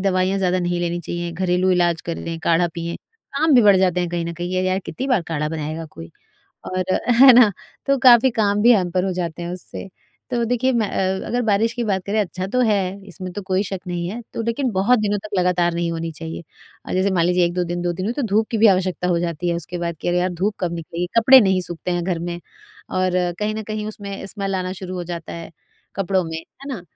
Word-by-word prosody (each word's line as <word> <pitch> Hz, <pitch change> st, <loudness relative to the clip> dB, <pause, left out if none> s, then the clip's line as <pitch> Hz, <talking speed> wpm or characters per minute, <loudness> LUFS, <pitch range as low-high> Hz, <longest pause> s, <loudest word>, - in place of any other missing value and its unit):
दवाइयाँ 185 Hz, +1 st, +1 dB
ज़्यादा 185 Hz, -1 st, +1 dB
नहीं 175 Hz, -1 st, -1 dB
लेनी 175 Hz, 0 st, -2 dB
चाहिए, 175 Hz, +1 st, -4 dB
घरेलू 180 Hz, +1 st, +1 dB
इलाज 175 Hz, -2 st, +2 dB
कर 170 Hz, -, -3 dB
लें, 165 Hz, 0 st, -5 dB
काढ़ा 170 Hz, +1 st, +3 dB
पिएँ, 170 Hz, 0 st, -4 dB, 0.4 s
काम 310 Hz, +1 st, +3 dB
भी 245 Hz, -, +7 dB
बढ़ 205 Hz, -2 st, +6 dB
जाते 180 Hz, -1 st, +2 dB
हैं 175 Hz, -, -1 dB
कहीं 175 Hz, -1 st, -2 dB
न 170 Hz, -, -4 dB
कहीं, 175 Hz, +1 st, -4 dB
ये 185 Hz, -, +1 dB
यार 185 Hz, +1 st, +1 dB
कितनी 265 Hz, -, -4 dB
बार 245 Hz, -9 st, +2 dB
काढ़ा 150 Hz, -1 st, -1 dB
बनाएगा 155 Hz, +1 st, -4 dB
कोई 80 Hz, 0 st, -10 dB, 0.6 s
और 185 Hz, 0 st, -2 dB, 0.4 s
है 270 Hz, -1 st, +11 dB
ना? 235 Hz, -3 st, +7 dB, 0.3 s
तो 275 Hz, 0 st, +2 dB
काफ़ी 245 Hz, +1 st, +8 dB
काम 210 Hz, -2 st, +1 dB
भी 240 Hz, +3 st, +7 dB
हैम्पर 180 Hz, -3 st, +1 dB
हो 190 Hz, -, 0 dB
जाते 175 Hz, -2 st, -4 dB
हैं 170 Hz, -, -4 dB
उससे। 185 Hz, +1 st, -7 dB, 0.4 s
तो 240 Hz, -2 st, 0 dB
देखिए 245 Hz, +2 st, +1 dB
मैं 225 Hz, -4 st, +1 dB
अ, 190 Hz, 0 st, -1 dB
अगर 245 Hz, +1 st, 0 dB
बारिश 220 Hz, 0 st, +1 dB
की 240 Hz, -, -2 dB
बात 195 Hz, -4 st, 0 dB
करें 210 Hz, +2 st, 0 dB
अच्छा 185 Hz, -1 st, -4 dB
तो 250 Hz, +6 st, -1 dB
है, 210 Hz, -2 st, +3 dB, 0.3 s
इसमें 185 Hz, 0 st, -7 dB
तो 205 Hz, -, -5 dB
कोई 190 Hz, +1 st, 0 dB
शक 195 Hz, -1 st, -5 dB
नहीं 175 Hz, -1 st, -3 dB
है, 235 Hz, +4 st, -5 dB
तो -, -, -3 dB
लेकिन 235 Hz, +3 st, -1 dB
बहुत 210 Hz, +6 st, +3 dB
दिनों 205 Hz, -1 st, 0 dB
तक 215 Hz, -, -8 dB
लगातार 180 Hz, -1 st, +2 dB
नहीं 170 Hz, 0 st, -1 dB
होनी 165 Hz, 0 st, -3 dB
चाहिए 160 Hz, +1 st, -7 dB, 0.4 s
अ, -, -, -6 dB
जैसे 190 Hz, +2 st, +1 dB
मान 170 Hz, -3 st, +2 dB
लीजिए 180 Hz, 0 st, +3 dB
1-2 180 Hz, +1 st, -1 dB
दिन, 175 Hz, 0 st, -3 dB
2 175 Hz, 0 st, -1 dB
दिन 185 Hz, +2 st, -4 dB
हुई, 225 Hz, -, -1 dB
तो 285 Hz, -, -3 dB
धूप 215 Hz, -1 st, +1 dB
की 225 Hz, -, 0 dB
भी 220 Hz, -, +6 dB
आवश्यकता 185 Hz, -2 st, +1 dB
हो 175 Hz, -1 st, +2 dB
जाती 170 Hz, 0 st, -2 dB
है 170 Hz, -, 0 dB
उसके 170 Hz, +1 st, -5 dB
बाद, 170 Hz, -1 st, -3 dB
कि -, -, -4 dB
अरे, 175 Hz, 0 st, +2 dB
यार 180 Hz, +1 st, +1 dB
धूप 200 Hz, +5 st, -1 dB
कब 175 Hz, -2 st, -2 dB
निकलेगी, 170 Hz, +1 st, -4 dB
कपड़े 260 Hz, +4 st, +8 dB
नहीं 190 Hz, -4 st, +2 dB
सूखते 175 Hz, 0 st, -4 dB
हैं 175 Hz, -1 st, -1 dB
घर 175 Hz, -2 st, -1 dB
में। 175 Hz, 0 st, -4 dB, 0.5 s
और 185 Hz, 0 st, 0 dB, 0.3 s
कहीं 215 Hz, +1 st, -1 dB
न 220 Hz, -, -4 dB
कहीं 215 Hz, 0 st, -4 dB
उसमें 200 Hz, -2 st, -7 dB
स्मैल 195 Hz, -1 st, -3 dB
आना 185 Hz, 0 st, -2 dB
शुरू 185 Hz, 0 st, -5 dB
हो 180 Hz, -, -3 dB
जाता 170 Hz, -1 st, -6 dB
है, 165 Hz, -1 st, -8 dB, 0.4 s
कपड़ों 190 Hz, -1 st, 0 dB
में, 160 Hz, -1 st, -5 dB
है 265 Hz, +11 st, -14 dB
ना? 210 Hz, -, -6 dB
185 Hz, 245 wpm, -21 LUFS, 175-210 Hz, 0.6 s, है